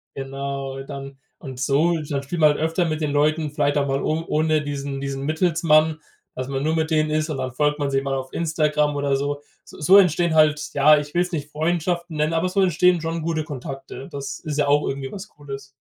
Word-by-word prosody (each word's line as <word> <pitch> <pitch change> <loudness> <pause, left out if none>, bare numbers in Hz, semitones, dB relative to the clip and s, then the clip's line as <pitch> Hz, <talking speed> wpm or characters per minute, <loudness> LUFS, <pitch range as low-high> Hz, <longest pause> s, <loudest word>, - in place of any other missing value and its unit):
Genau, 135 0 -5
dann 135 -1 -8 0.2
und 130 -4 -8
so 150 +6 +2
ist 150 -2 -7
halt 140 -1 -2
spielt 165 +4 -3
man 150 -1 +7
halt - - -3
öfter 165 +3 +1
mit 155 -1 -2
den 150 - 0
Leuten, 150 +1 +1
vielleicht 145 -1 +1
auch 140 -1 +1
mal 135 0 0
o 160 +1 -1
ohne 155 0 +2
diesen 140 -1 -4
diesen 135 0 -4
Mittelsmann, 155 0 +2 0.4
dass 130 0 -4
man 135 0 -2
nur 160 +1 +1
mit 160 0 -1
denen 155 -1 +2
ist, 155 +1 0
und 145 - -3
dann 130 -1 -4
folgt 150 +2 +1
man 145 - 0
sich 135 0 +1
mal 135 -1 -2
auf 130 0 -5
Instagram 150 -2 +1
oder 140 -1 0
so. 145 +1 -2 0.2
S - - -16
so 185 +6 +5
entstehen 175 -3 +4
halt 150 -1 +3
ja, 150 +2 +6
ich 150 0 -4
will 175 - +2
es 180 +1 -2
nicht 150 -2 -4
Freundschaften 170 +1 -1
nennen, 155 +2 +1
aber 170 +3 +1
so 195 +1 +1
entstehen 180 -1 +3
schon 165 0 -3
gute 160 -1 -1
Kontakte. 135 -2 -7
Das 140 -1 -5
ist 150 -3 -5
ja 145 -1 +2
auch 145 +1 +3
irgendwie 135 -1 -4
was 200 +1 -7
Cooles. 140 -2 -9
150 Hz, 230 wpm, -23 LUFS, 140-160 Hz, 0.4 s, man